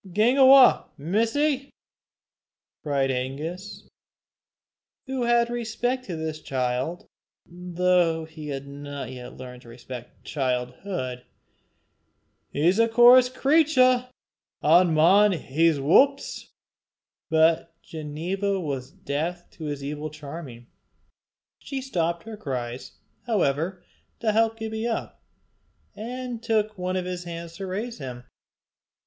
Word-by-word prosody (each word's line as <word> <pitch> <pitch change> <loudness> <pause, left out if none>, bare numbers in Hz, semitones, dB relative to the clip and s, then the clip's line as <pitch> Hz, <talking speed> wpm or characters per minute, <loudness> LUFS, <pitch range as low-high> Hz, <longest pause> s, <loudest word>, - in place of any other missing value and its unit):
"Gang 235 +7 +3
awa, 265 -1 +7
missie," 255 - 0 1.1
cried 140 -3 0
Angus, 150 +10 -5 1.2
who 265 -2 -2
had 235 0 +3
respect 240 +2 -2
to 180 - -5
this 160 -1 -4
child, 130 +6 -2 0.4
though 175 -2 +1
he 160 -1 -10
had 140 -1 -4
not 145 -1 -7
yet 125 -1 -9
learned 125 -1 -9
to - - -17
respect 120 0 -10
childhood; 125 +1 -3 1.3
"he's 175 +8 +2
a 230 0 +4
coorse 245 +2 +7
cratur, 255 -3 +3 0.5
an' 170 +3 +5
maun 195 +6 +5
hae 165 +1 +2
's 155 - -3
whups." 275 - +2 0.8
But 165 +1 +2
Ginevra 175 +6 -3
was 135 -6 -4
deaf 165 +6 -4
to 160 - -9
his 145 -2 -4
evil 150 +2 -4
charming. 145 -5 -9 0.9
She 275 - -5
stopped 170 -10 -2
her 225 -1 -8
cries, 125 - -5 0.3
however, 180 - 0 0.4
to 220 - +1
help 225 +1 +2
Gibbie 220 0 -3
up, 230 - -4 0.7
and 245 +1 -6
took 215 -2 0
one 185 -1 -3
of 185 -1 -1
his 180 -1 -5
hands 170 -1 -7
to 195 - -5
raise 215 +4 -4
him. 125 -3 -7
175 Hz, 115 wpm, -25 LUFS, 145-225 Hz, 1.3 s, awa